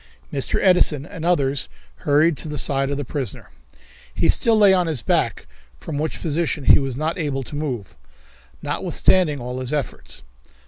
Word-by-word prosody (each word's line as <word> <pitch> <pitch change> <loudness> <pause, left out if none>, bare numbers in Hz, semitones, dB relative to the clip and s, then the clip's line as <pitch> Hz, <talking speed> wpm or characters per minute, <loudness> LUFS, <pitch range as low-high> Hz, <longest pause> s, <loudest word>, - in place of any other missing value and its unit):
Mr. 135 - 0
Edison 170 -6 +3
and 165 -3 -9
others 140 - +1 0.3
hurried 150 - +3
to - - -7
the 150 -1 -4
side 135 0 0
of 140 - -2
the 145 - -4
prisoner. 130 - -6 0.6
He - - +1
still 230 -2 +3
lay 205 -2 +6
on 180 -2 +2
his 150 -8 -2
back, - - 0 0.3
from 145 - -5
which 155 +1 -3
position 160 -2 -1
he - - +7
was 135 -3 -3
not 160 +4 -2
able 140 -4 -2
to 145 - -8
move, 130 -10 -4 0.7
notwithstanding 160 -7 +1
all 125 +1 -5
his 130 -1 -3
efforts. 150 -3 -4
145 Hz, 170 wpm, -22 LUFS, 135-165 Hz, 0.7 s, he